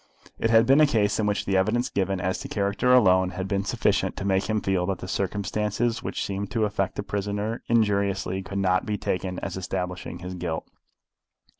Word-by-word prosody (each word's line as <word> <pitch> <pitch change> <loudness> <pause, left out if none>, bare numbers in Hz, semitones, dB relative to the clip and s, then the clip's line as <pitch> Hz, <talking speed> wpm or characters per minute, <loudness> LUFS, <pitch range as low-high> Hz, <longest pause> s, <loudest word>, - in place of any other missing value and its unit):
It 115 - +1
had 115 0 +6
been 135 +5 +5
a 155 - +6
case 105 -5 +1
in 105 - +1
which 105 0 0
the 100 - 0
evidence 110 +6 +2
given 95 -1 -1
as 95 +1 -1
to - - -6
character 100 +5 0
alone 95 -7 +5
had 95 0 -2
been 100 -1 0
sufficient 100 -3 0
to 100 - -4
make 95 -1 +2
him 110 0 +2
feel 95 -3 0
that 95 -2 -1
the 95 - -8
circumstances 105 +4 -1
which - - -3
seemed 100 0 -3
to 110 -2 +2
affect 100 -2 -1
the - - -3
prisoner 105 +3 -3
injuriously 100 -4 +1
could 95 +1 -6
not 95 -1 +1
be 105 -1 -1
taken 90 -1 -2
as 95 -1 -4
establishing 90 -1 -4
his 90 +1 -7
guilt. 85 -3 -4
100 Hz, 200 wpm, -25 LUFS, 95-105 Hz, -, had